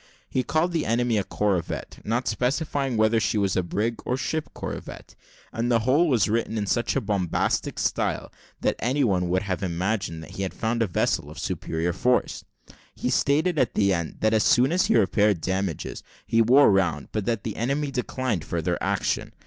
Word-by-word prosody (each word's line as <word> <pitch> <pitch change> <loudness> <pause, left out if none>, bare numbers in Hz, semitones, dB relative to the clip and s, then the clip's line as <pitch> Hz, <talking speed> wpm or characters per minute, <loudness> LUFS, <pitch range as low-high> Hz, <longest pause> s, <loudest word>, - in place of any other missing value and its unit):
He 130 - 0
called 160 +6 0
the 165 -2 -1
enemy 115 -1 +2
a - - -1
corvette, 95 -4 -2
not 120 +4 -1
specifying 135 +2 -1
whether 110 +1 +3
she 110 - 0
was 100 -2 +1
brig 105 +6 -1
or 125 - -1
ship 155 +3 -2
corvette; - - -7 0.4
and 120 +2 -1
the 115 -1 +3
whole 140 +9 +3
was 125 -7 +3
written 110 +1 -1
in 105 - -1
such 120 +4 0
a 135 - +1
bombastic 100 -5 -1
style, - - -1 0.3
that - - +1
any 135 +5 +1
one 90 -6 +1
would 95 +2 +1
have 95 -1 -3
imagined 90 -2 -2
that - - -11
he - - -6
had 95 - -3
found 115 +1 -1
a 115 - +2
vessel 90 - 0
of - - -11
superior 80 +2 -2
force. 90 -4 0 0.5
He - - -2
stated, 155 +4 +2
at 125 - +1
the 100 -2 +3
end, 85 -3 -4
that 110 0 +3
as 110 - +3
soon 125 +4 +4
as 180 +2 +2
he - - +4
repaired 105 -2 +3
damages, 95 -1 -3 0.2
he 115 - +3
wore 125 +3 +6
round, 90 -7 +1
but 105 -3 -2
that 115 -3 -1
the 110 - -4
enemy 140 +5 -1
declined 125 - -2
further 85 +1 -2
action. - - -1
110 Hz, 190 wpm, -25 LUFS, 95-125 Hz, 0.5 s, wore